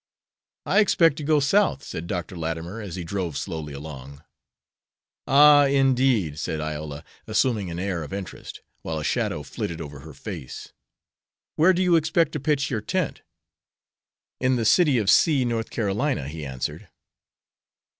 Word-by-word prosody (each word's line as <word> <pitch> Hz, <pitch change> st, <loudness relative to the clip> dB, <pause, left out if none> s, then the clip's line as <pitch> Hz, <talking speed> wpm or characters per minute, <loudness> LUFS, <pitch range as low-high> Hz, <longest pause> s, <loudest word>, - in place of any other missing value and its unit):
"I -, -, +3 dB
expect 165 Hz, -7 st, +4 dB
to 150 Hz, -, -5 dB
go 150 Hz, 0 st, +3 dB
South," 150 Hz, 0 st, +2 dB
said 80 Hz, +1 st, -6 dB
Dr. 90 Hz, 0 st, -4 dB
Latimer, 85 Hz, +5 st, -4 dB
as 100 Hz, -5 st, -6 dB
he 90 Hz, -, -5 dB
drove 85 Hz, -3 st, -3 dB
slowly 80 Hz, -2 st, -5 dB
along. 70 Hz, 0 st, -9 dB, 1.0 s
"Ah, 145 Hz, +1 st, +7 dB
indeed," 130 Hz, -, +2 dB
said 80 Hz, -, -3 dB
Iola, 75 Hz, -1 st, -5 dB, 0.2 s
assuming 110 Hz, -3 st, +1 dB
an 85 Hz, -, -5 dB
air 90 Hz, -2 st, -2 dB
of 75 Hz, -, -8 dB
interest, 95 Hz, -1 st, -7 dB, 0.2 s
while 80 Hz, -, -4 dB
a 75 Hz, -, -4 dB
shadow -, -, -1 dB
flitted 85 Hz, -, -5 dB
over 75 Hz, -3 st, -8 dB
her -, -, -12 dB
face. 65 Hz, -, -8 dB, 0.8 s
"Where 165 Hz, +5 st, +5 dB
do 185 Hz, 0 st, +1 dB
you 175 Hz, -2 st, +4 dB
expect 160 Hz, 0 st, +1 dB
to 150 Hz, -, -3 dB
pitch 140 Hz, 0 st, 0 dB
your 110 Hz, -4 st, -1 dB
tent?" 185 Hz, -, -2 dB, 1.2 s
"In 130 Hz, 0 st, +2 dB
the 115 Hz, -2 st, -1 dB
city 150 Hz, +1 st, +4 dB
of 105 Hz, -4 st, 0 dB
C, 135 Hz, -, +4 dB
North 115 Hz, -1 st, -2 dB
Carolina," 110 Hz, -, -1 dB
he 75 Hz, 0 st, -6 dB
answered. 65 Hz, -2 st, -5 dB
105 Hz, 155 wpm, -24 LUFS, -, 1.2 s, Ah